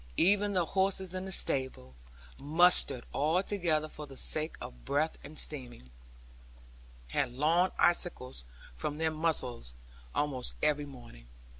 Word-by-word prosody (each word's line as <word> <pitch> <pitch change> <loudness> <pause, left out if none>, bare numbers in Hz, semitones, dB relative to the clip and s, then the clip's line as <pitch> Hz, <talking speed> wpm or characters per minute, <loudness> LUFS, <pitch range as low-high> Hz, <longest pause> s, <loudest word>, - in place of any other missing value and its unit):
Even 205 +3 +3
the 180 -3 +2
horses 190 0 0
in 185 0 -4
the 190 - -6
stables 130 - -1 0.5
(mustered 150 -3 +3
all 160 +6 +2
together 170 -7 0
for 150 -1 -9
the 135 -1 -12
sake 155 +4 0
of - - -9
breath 150 - 0
and 150 +2 -10
steaming) 120 - -5 1.2
had 125 - 0
long 165 +7 +3
icicles 150 - +1 0.3
from 70 - -4
their 160 0 +1
muzzles, 130 - +1 0.4
almost 135 -4 -1
every 150 -1 +2
morning. 120 - -13
150 Hz, 130 wpm, -31 LUFS, 130-175 Hz, 1.2 s, Even